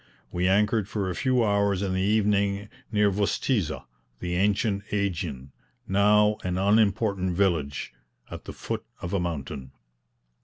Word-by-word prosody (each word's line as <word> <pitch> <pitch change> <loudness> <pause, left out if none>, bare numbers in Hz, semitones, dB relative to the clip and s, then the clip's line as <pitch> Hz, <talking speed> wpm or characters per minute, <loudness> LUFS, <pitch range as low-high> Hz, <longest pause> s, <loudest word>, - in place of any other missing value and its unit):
We 90 +1 0
anchored 105 +1 +2
for 100 -3 -2
a - - -4
few 130 +1 +2
hours 100 -2 +1
in 95 -2 -1
the 95 - 0
evening 100 0 +1 0.2
near 105 -2 +3
Vostizza, 100 - 0 0.3
the 90 -1 -3
ancient 100 +2 +1
AEgion, 85 -10 -2 0.4
now 105 +2 +4
an 90 0 -1
unimportant 100 -2 +2
village, 80 -10 0 0.4
at - - -8
the - - -7
foot - - -4 0.2
of 85 - -4
a 100 - +2
mountain. 70 -6 -4
100 Hz, 140 wpm, -26 LUFS, 90-105 Hz, 0.4 s, now